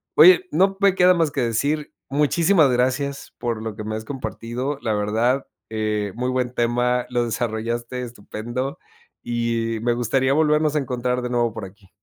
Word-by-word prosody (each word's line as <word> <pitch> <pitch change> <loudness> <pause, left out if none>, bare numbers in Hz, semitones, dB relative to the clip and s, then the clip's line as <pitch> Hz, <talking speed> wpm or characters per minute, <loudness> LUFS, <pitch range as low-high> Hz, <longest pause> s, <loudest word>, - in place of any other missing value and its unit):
Oye 180 +3 +8
no, 195 +5 +2
me 195 -1 +4
queda 180 0 +6
más 165 -4 +1
que 140 - -3
decir 140 +6 -1 0.2
muchísimas 155 +2 +3
gracias 130 +3 -1
por 115 -2 -3
lo 110 -1 -4
que 110 - -6
me 110 0 -3
has 110 - -5
compartido, 125 +2 -4
la 110 - -1
verdad, 110 +6 0 0.2
eh, 105 -2 -1
muy 125 +2 -2
buen 125 -1 -1
tema, 120 +1 +1
lo 120 -1 +1
desarrollaste 115 +2 -3
estupendo, 120 +3 -5 0.4
y 115 -1 -1
me 120 +1 +1
gustaría 130 +3 +1
volvernos 150 0 +2
a - - +3
encontrar 125 -1 -1
de 125 - -3
nuevo 120 -2 +1
por 110 - -6
aquí. 95 0 -16
125 Hz, 170 wpm, -22 LUFS, 115-140 Hz, 0.4 s, Oye